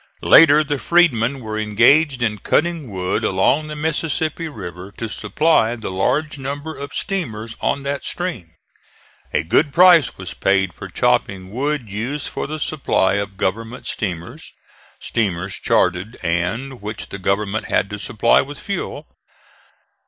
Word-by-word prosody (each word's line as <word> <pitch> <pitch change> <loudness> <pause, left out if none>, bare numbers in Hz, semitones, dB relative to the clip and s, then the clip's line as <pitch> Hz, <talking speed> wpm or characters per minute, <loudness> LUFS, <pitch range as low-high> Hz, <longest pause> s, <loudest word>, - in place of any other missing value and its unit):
Later 155 -1 +7
the 145 -1 -2
freedmen 140 -7 +2
were 110 -1 -4
engaged 120 +6 +3
in 105 -3 -1
cutting 165 - 0
wood 95 -2 -2
along 135 +11 +2
the 150 - -6
Mississippi 160 +1 -2
River 95 - -8
to 115 - -5
supply 115 +3 +1
the 115 -5 -6
large 145 +11 0
number 145 +4 -5
of 140 0 -7
steamers 115 - -3
on 140 - 0
that 140 -1 -3
stream. 125 - -4 0.8
A 75 - 0
good 125 - +2
price 175 -3 +6
was 95 -2 -7
paid 95 -2 +1
for - - -9
chopping 95 -1 0
wood 135 +1 -2
used 125 +8 -3
for - - -4
the 155 +2 -5
supply 140 -11 +1
of 100 -1 -7
government 115 +6 -3
steamers 85 -5 -5 0.5
(steamers 95 -4 -2
chartered 90 +5 0
and 100 +10 -2
which 105 +1 -6
the 100 - -7
government 100 +3 -1
had 105 - +1
to 105 - -5
supply 110 +2 +3
with 145 +1 -8
fuel). 200 - -5
115 Hz, 145 wpm, -20 LUFS, 100-150 Hz, 0.8 s, Later